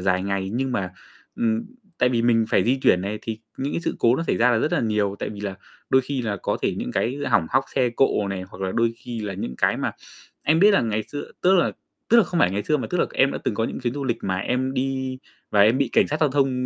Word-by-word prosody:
dài 90 0 +1
ngày, 100 0 -2
nhưng 130 +2 -1
mà, 95 -5 -2 0.4
ừm 115 -1 0 0.3
tại 125 - +4
vì 120 -2 +1
mình 115 -1 +3
phải 95 - +3
di 130 +3 +2
chuyển 90 - +4
này, 100 +3 -3
thì 110 -1 -4 0.2
những 140 +2 -3
cái - - -1
sự - - -2
cố 120 +2 +4
nó - - -1
xảy - - +1
ra 125 +2 +4
là 115 - +3
rất 150 - 0
là - - +2
nhiều. 105 -3 0
Tại - - -3
vì 105 -1 -8
là 100 -2 -4 0.4
đôi 130 - +5
khi 130 -1 -3
là 105 -3 -2
có - - 0
thể - - +1
những - - -4
cái 125 +4 0
hỏng 115 -9 +3
hóc 135 +1 +2
xe 130 -2 +3
cộ 115 -5 +1
này, 95 -1 -3
hoặc 95 - -12
là 95 -1 -1
đôi 115 0 +1
khi 120 -1 -7
là 105 -2 -4
những 80 -9 -5
cái - - +2
mà - - -1 0.5
em 160 +2 +3
biết 205 +2 +7
là - - +4
ngày 110 -2 -1
xưa 145 +6 -8
tức 185 +2 +5
là 175 - +2 0.4
tức 235 - +6
là 230 - +7
không 175 -2 -1
phải 90 - +4
ngày 100 +2 -2
xưa, 150 +8 +1
mà 130 - -3
tức 180 - 0
là - - +3
em 135 +1 +4
đã - - -4
từng 105 - 0
có 115 - 0
những - - -4
chuyến 125 0 -2
du 140 -1 -4
lịch 120 -3 0
mà 95 -1 -1
em 130 +6 -1
đi 130 0 -2 0.3
và 105 - +3
em 110 +5 +5
bị 140 -3 +1
cảnh - - +4
sát 155 - -2
giao 155 - +4
thông 135 -2 +1
120 Hz, 290 wpm, -23 LUFS, 105-135 Hz, 0.5 s, biết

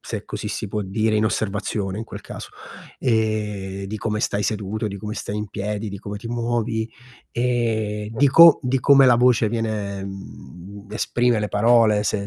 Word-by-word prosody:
se - - -6
così - - -5
si 105 - -4
può 105 +1 -2
dire, 110 +3 0
in 105 - +2
osservazione 100 -2 -2
in 110 - -4
quel - - -9
caso, - - -9 0.5
ehm, 105 -5 -1
di 105 +3 -5
come 105 0 -2
stai 100 0 0
seduto, 110 +1 -2
di 100 - -6
come 105 +1 -5
stai 105 - -5
in 105 -1 -4
piedi, 105 +2 -4
di 100 -1 -7
come 100 0 -7
ti 115 - -9
muovi, 115 -1 -2 0.4
e 110 -4 -1
di 140 +5 +3
co 165 +3 +8
di 130 0 0
come 140 -1 +6
la 120 -2 +6
voce 120 -3 +3
viene 105 -3 -3
mhmm, 95 - -10
esprime 120 +1 +1
le 105 -1 -2
parole, 110 0 +4
se 100 0 -1
110 Hz, 180 wpm, -22 LUFS, 100-115 Hz, 0.5 s, co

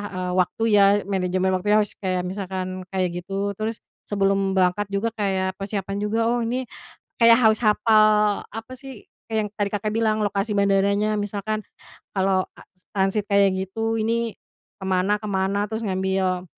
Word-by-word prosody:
eee, 180 0 -2
waktu 180 +5 0
ya, 205 -1 +6 0.2
manajemen 185 -1 0
waktu 185 +2 -4
harus 210 -1 +2
kayak 185 -2 -1
misalkan 185 -1 -5
kayak 180 -2 -1
gitu. 200 +2 -2
Terus 220 +1 -3 0.2
sebelum 195 -1 +1
berangkat 190 +2 +2
juga 200 +4 -1
kayak 190 -3 -1
persiapan 195 0 -3
juga, 210 +2 -1
oh 240 - +1
ini 245 +3 -1 0.6
kayak 230 0 +7
harus 220 -2 +4
hafal 210 -1 +4
apa 225 +4 -8
sih 265 -5 -11 0.2
kayak 220 - 0
yang - - -14
tadi 205 -1 0
Kakak 210 +1 -2
bilang 220 -1 +1
lokasi 200 +2 -1
bandaranya 200 +2 +2
misalkan, 205 +1 -3 0.5
kalau 190 -1 +2
as - - -16 0.3
transit 195 +2 +1
kayak 200 -1 +4
gitu 225 +4 -2
ini 230 0 0 0.5
ke 190 - -7
mana 190 +3 +1
ke 215 - -5
mana. 195 +1 0
Terus 220 +1 -3
ngambil, 190 -1 0
200 Hz, 160 wpm, -23 LUFS, 190-215 Hz, 0.6 s, kayak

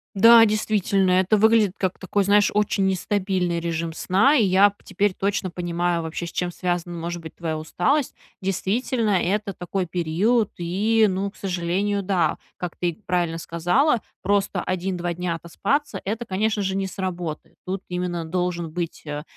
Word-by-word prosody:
Да, 230 +3 +8
действительно, 210 -3 +1
это 185 +3 +3
выглядит 220 -2 +4
как 190 -1 -1
такой, 195 +1 0
знаешь, 205 +1 +4
очень 205 -1 +1
нестабильный 185 -2 0
режим 165 -1 -2
сна, 195 - +3
и 235 - +4
я 195 +2 +5
п 200 - -24
теперь 205 -2 0
точно 195 -1 -1
понимаю, 175 -1 -1
вообще, 160 +1 -4
с 170 - -8
чем 180 -1 -1
связана, 175 -1 -3
может 170 +1 -5
быть, 160 - -10
твоя 160 -2 -3
усталость. 245 - 0 0.3
Действительно, 215 +5 0
это 200 +2 -1
такой 180 +1 -3
период 185 +7 +1
и, 210 +6 +2
ну 195 +1 -2
к - - -25
сожалению, 195 +2 -1
да. 180 -5 +1 0.2
Как 180 -2 -5
ты 175 0 -2
правильно 175 -2 0
сказала, 180 - +1 0.2
просто 200 +1 0
1-2 180 -1 -2
дня 175 -1 -2
отоспаться- 200 - -2
это, 225 +4 -3
конечно 210 +2 0
же, 190 0 -1
не 195 -1 -1
сработает. 180 -5 -5
Тут 190 +1 -4
именно 180 -2 -3
должен 175 -1 -2
быть, 170 -2 -5
э, 150 0 -4
185 Hz, 160 wpm, -23 LUFS, 175-205 Hz, 0.3 s, Да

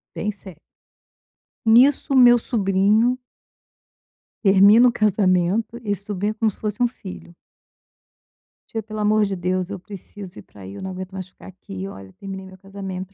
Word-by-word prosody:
Bem 210 - -2
sério. 190 -5 -13 1.1
Nisso, 255 +5 +4
o - - +4
meu 245 -1 +8
sobrinho 215 +2 +2 1.3
termina 200 +4 +6
o - - +3
casamento. 210 +1 +1
Esse 205 -2 -3
sobrinho 205 0 -2
é - - -6
como 220 0 0
se - - -20
fosse 210 +1 -4
um 245 - +5
filho. 85 - -11 1.4
"Tia 225 -1 -4
pelo 215 0 -7
amor 215 +1 +3
de 195 -1 -3
Deus 180 0 -2
eu 200 -2 -6
preciso 195 -1 -9
ir - - -8
para 100 - -17
ai, 95 +1 -9
eu - - -8
não 190 - -5
aguento 185 0 -7
mais 190 -1 -7
ficar - - -16
aqui. 95 - -8
Olha, 95 0 -11
terminei 190 -1 -8
meu 190 0 -13
casamento", 195 -1 -7
195 Hz, 170 wpm, -22 LUFS, 185-215 Hz, 1.4 s, meu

